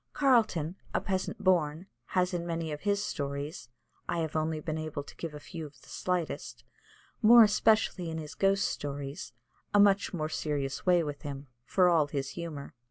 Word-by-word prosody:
Carleton, 220 - +2 0.2
a - - +4
peasant 190 +1 -3
born, 170 -3 +2 0.2
has 180 +3 0
in 175 -1 -1
many 165 -2 -3
of 150 - -5
his 200 0 +1
stories 140 -3 -4 0.4
I 175 - 0
have 160 -2 -2
been 155 - +1
only 155 -1 -2 0.2
able 145 -2 -4
to - - -13
give 165 -3 -6
a - - -7
few 165 +2 -8
of 140 -3 -19
the - - -18
slightest 180 -3 -3 0.6
more 235 +1 +9
especially 210 -4 +2
in 160 - -4
his 155 -2 -6
ghost 195 +1 +2
stories, 140 +2 -5 0.4
a - - +6
much 200 0 +4
more 155 -4 -2
serious 145 -1 -3
way 175 -2 +5
with 145 -2 -5
him, 140 -1 -7 0.2
for 185 -2 +4
all 165 -4 +4
his 140 -2 -3
humour. 160 -5 -6
165 Hz, 180 wpm, -30 LUFS, 150-185 Hz, 0.6 s, more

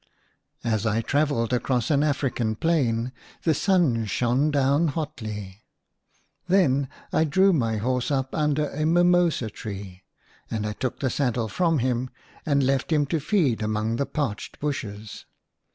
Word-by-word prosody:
S 110 -2 0
I 110 +1 +1
travelled 140 -2 0
across 125 +1 0
an 145 -1 +3
African 130 -6 0
plain 125 -5 +1 0.3
the 160 - +3
sun 155 - +2
shone 125 +8 +1
down 145 +3 +2
hotly. 110 -10 -5 0.9
Then 140 -8 +3 0.2
I - - +3
drew 190 +5 +4
my 115 -8 +1
horse 125 +3 -1
up 135 -2 -1
under 150 -1 +1
a 155 - -2
mimosa 175 -7 +3
tree, 100 -4 -8 0.5
and 110 -2 -2
I 105 - -2
took 130 +3 -4
the 130 -3 0
saddle 120 -4 0
from 165 - +1
him 125 0 0 0.4
and 140 -2 +3
left 135 +3 0
him 150 -2 +3
to 165 - +2
feed 150 - +1
among 110 +1 -1
the 140 - -1
parched 125 -9 -4
bushes. 110 -8 -5
130 Hz, 145 wpm, -25 LUFS, 115-150 Hz, 0.9 s, drew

